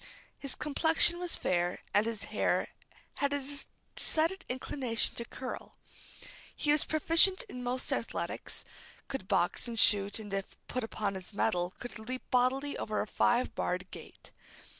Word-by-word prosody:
His 275 -2 -2
complexion 320 +3 +3
was 355 -1 +2
fair 175 0 0
and 210 +2 +4
his 230 -2 -2
hair - - +1 0.5
had 280 0 +1
a 285 0 -1 0.3
decided 330 +5 +1
inclination 250 -2 -1
to 235 - -4
curl. 255 +1 -7 0.8
He 295 - +1
was 300 -1 +4
proficient 335 +7 +5
in 325 - -8
most 250 +1 0
athletics; - - -2 0.4
could 270 -8 -5
box 175 +7 +1
and 235 -1 -5
shoot, 200 -1 +5
and 210 -3 -6
if 195 -1 -3
put 255 - -2
upon 215 -2 -2
his 190 +2 -8
mettle, 180 -4 +1
could 245 -2 -7
leap 255 +4 -4
bodily 260 +3 +2
over 215 0 -1
a - - 0
five 240 +3 +2
barred 180 +1 -2
gate. - - -11
250 Hz, 150 wpm, -32 LUFS, 210-285 Hz, 0.8 s, proficient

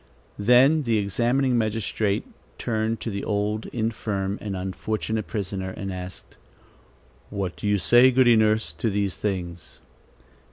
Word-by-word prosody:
Then 125 +8 +5
the 115 -5 +1
examining 120 +5 +1
magistrate 110 -2 -1 0.3
turned 110 -1 -1
to 115 - -3
the 100 0 -4
old, 105 +1 -1
infirm 105 -4 -2
and 100 -2 -4
unfortunate 110 +4 -3
prisoner, 95 -3 -3
and 95 0 -5
asked: 90 0 -9 0.9
"What 95 -3 -3
do - - -4
you 105 0 +3
say, 120 +9 +6
Goody 125 -2 +5
Nurse, 110 -7 +2
to 85 +8 -1
these 100 -2 -1
things?" 90 -4 -4
105 Hz, 130 wpm, -24 LUFS, 95-115 Hz, 0.9 s, say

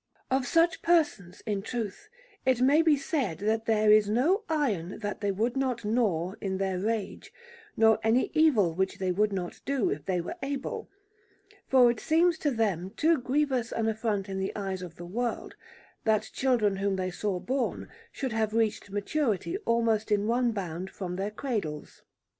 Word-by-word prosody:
Of 260 -1 +1
such 330 +3 +3
persons, 295 - +1
in 205 -2 -1
truth, 230 - -5 0.3
it 260 -2 +2
may 280 +5 +5
be 315 -3 +4
said 275 - -2
that 220 +4 0
there 215 -1 +4
is 210 -1 +5
no 320 - +2
iron 220 - -1
that 205 -1 -4
they 205 -1 +1
would 225 +6 -1
not 255 -4 -1
gnaw 200 -6 +1
in 190 -1 -2
their 190 -1 -1
rage, 215 0 -3 0.5
nor 220 -1 +5
any 225 +3 +2
evil 240 - +4
which 190 +3 -1
they 185 -1 -1
would 210 +3 +1
not 180 -3 -4
do 275 -5 0
if 145 - -4
they 185 -2 0
were 175 - -5
able, 275 0 -4 0.8
for 250 -2 +6
it 235 - -6
seems 335 +1 +2
to 295 - +1
them 205 - -1
too 320 -1 +3
grievous 260 -2 0
an 225 -1 -1
affront 215 -3 -1
in 190 -1 -4
the 190 - -3
eyes 195 -2 -3
of 175 -3 -8
the 175 - -9
world, 235 +7 -3 0.5
that 215 -1 +1
children 230 -7 +1
whom 195 0 0
they 185 -1 -2
saw 190 0 -2
born 255 +7 -2 0.2
should 260 -4 -4
have 220 -1 0
reached 220 -2 0
maturity 215 - -1
almost 225 -2 +1
in 205 0 +2
one 240 +2 +2
bound 185 -3 -4
from 185 -2 -5
their 195 +2 -2
cradles. 210 - -4
220 Hz, 175 wpm, -28 LUFS, 195-260 Hz, 0.8 s, for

